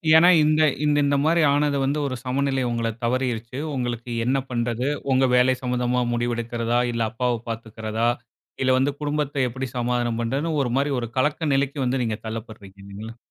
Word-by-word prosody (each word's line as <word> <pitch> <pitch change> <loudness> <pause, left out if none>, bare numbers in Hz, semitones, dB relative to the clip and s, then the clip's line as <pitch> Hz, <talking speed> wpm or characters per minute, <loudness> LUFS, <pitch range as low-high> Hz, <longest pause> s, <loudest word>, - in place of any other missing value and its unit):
ஏன்னா, 175 +3 +8
இந்த 155 +1 +3 0.4
இந்த 140 0 +2
மாரி 165 +1 +3
ஆனது 145 -1 +2
வந்து 140 +3 0
ஒரு 130 - -3
சமநிலை 135 0 0
உங்களை 115 -1 -1
தவறியிருச்சு. 125 0 -1 0.2
உங்களுக்கு 120 -1 -3
என்ன 130 +3 +2
பண்றது, 120 +1 -1 0.2
உங்க 130 0 +4
வேலை 125 +1 +5
சம்பந்தமா 125 0 0
முடிவெடுக்கிறதா, 120 0 -1
இல்ல 115 0 -2
அப்பாவ 125 -1 -1
பாத்துக்கிறதா, 110 0 -2 0.5
இல்ல 130 0 +3
வந்து 135 +2 +2
குடும்பத்தை 145 -1 -1
எப்டி 130 +2 -4
சமாதானம் 120 -1 0
பண்றதுன்னு 145 +7 -1
ஒரு 120 - -2
மாரி 140 +1 +1
ஒரு 120 -2 -4
கலக்க 150 +2 +1
நிலைக்கு 140 +1 0
வந்து 125 +1 0
நீங்க 110 -2 -2
தள்ளப்படுறீங்க. 110 -3 -8
இல்லைங்களா? 105 +4 -9
125 Hz, 160 wpm, -24 LUFS, 115-140 Hz, 0.5 s, ஏன்னா